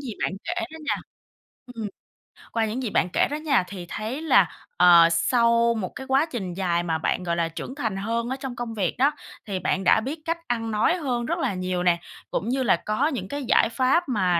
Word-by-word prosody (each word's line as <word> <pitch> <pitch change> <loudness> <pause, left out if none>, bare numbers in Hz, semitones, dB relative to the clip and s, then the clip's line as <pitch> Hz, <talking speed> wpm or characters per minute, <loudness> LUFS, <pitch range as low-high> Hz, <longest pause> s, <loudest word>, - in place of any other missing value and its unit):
gì 265 -5 -5
bạn - - 0
kể 345 - -2 0.2
đó - - -8
nha - - +3 0.7
ừm, 230 -4 -5 0.6
qua 225 -1 +1
những 230 +5 -3
gì 230 - -1
bạn 180 - +1
kể - - +3
đó - - -1
nha, 295 -9 +2
thì 185 -3 -7
thấy 225 +7 -4
là, 320 - +4 0.3
ờ, 170 -1 +8
sau 235 +5 +3
một 195 -5 -3
cái 265 - -7
quá 270 +3 +3
trình 190 -8 -4
dài 175 -2 0
mà 165 -2 0
bạn, 160 +3 -1
gọi 170 -1 -1
là, 170 -1 +1
trưởng 210 +10 -7
thành 220 -9 -2
hơn 230 +4 -2
ở 260 - -1
trong 265 -3 -5
công 235 -1 -5
việc 195 -6 -1
đó, 275 +3 +4 0.3
thì 195 -3 -3
bạn 190 +1 0
đã 190 - +5
biết 280 +7 -4
cách 330 0 0
ăn 225 -2 -1
nói 215 +10 +2
hơn 250 -7 -2
rất 340 +6 -1
là 260 -10 0
nhiều 185 -1 -2
nè, 175 -1 +3 0.3
cũng 220 - -2
như 260 +1 0
là 220 - +4
có 215 - 0
những 250 - -3
cái 285 +6 -4
giải 230 - +4
pháp 270 +7 +2
mà 185 -7 +2
230 Hz, 235 wpm, -25 LUFS, 185-265 Hz, 0.7 s, ờ